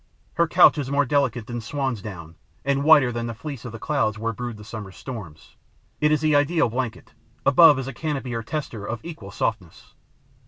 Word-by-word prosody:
Her 170 0 +2
couch 170 -2 +6
is 135 -2 -3
more 140 +1 +2
delicate 130 -4 0
than 120 0 -5
swan's 130 -2 -3
down 85 -6 -8 0.3
and 140 0 +1
whiter 145 -5 +6
than 120 0 -3
the 115 - -5
fleece 135 0 -7
of 120 - -6
the 115 - -7
clouds 115 -5 0
where 115 +1 -2
brood 120 0 -5
the 105 - -11
summer 105 -3 -8
storms. 95 - -9 0.4
It 150 0 +3
is 155 - +2
the 155 -1 +3
ideal 145 -1 +3
blanket. 120 -1 -4 0.3
Above 150 +1 +7
is 135 -1 -4
a 135 - -5
canopy 135 -3 -3
or 115 - -2
tester 115 -4 -5
of 110 +3 -4
equal 155 -13 -8
softness. 100 -3 -4
125 Hz, 200 wpm, -24 LUFS, 110-145 Hz, 0.4 s, Above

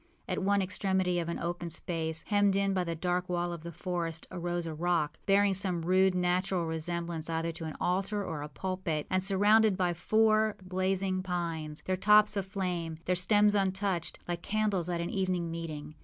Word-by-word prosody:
At - - -2
one 200 0 +2
extremity 185 -1 0
of 170 -1 -3
an 170 - -2
open 175 0 -3
space, 160 -1 -3
hemmed 205 -2 +2
in 195 0 +2
by 185 -1 +1
the 170 -1 -3
dark 180 +2 -1
wall 175 0 -1
of 170 - -7
the 170 +1 -7
forest, 170 -1 -3
arose 175 -1 -3
a 165 - -4
rock, 160 -2 0
bearing 200 0 +4
some 185 -3 -2
rude, 185 +2 +3
natural 180 0 +1
resemblance 165 0 -3
either 165 0 -1
to 165 0 -7
an 155 - -5
altar 195 +3 0
or 150 -2 -4
a 150 - -6
pulpit, 185 -1 -3
and 185 0 +2
surrounded 205 +1 +4
by 180 -2 +1
four 215 +4 +3
blazing 185 0 0
pines, 165 -4 -3
their 185 0 0
tops 210 +2 +5
aflame, 180 -5 -3
their 180 - +2
stems 205 +3 +4
untouched, 190 -3 0
like 175 -1 -3
candles 205 -4 0
at 170 -1 -1
an 170 - -3
evening 185 -3 -1
meeting. 155 -3 -6
180 Hz, 185 wpm, -30 LUFS, 170-195 Hz, -, tops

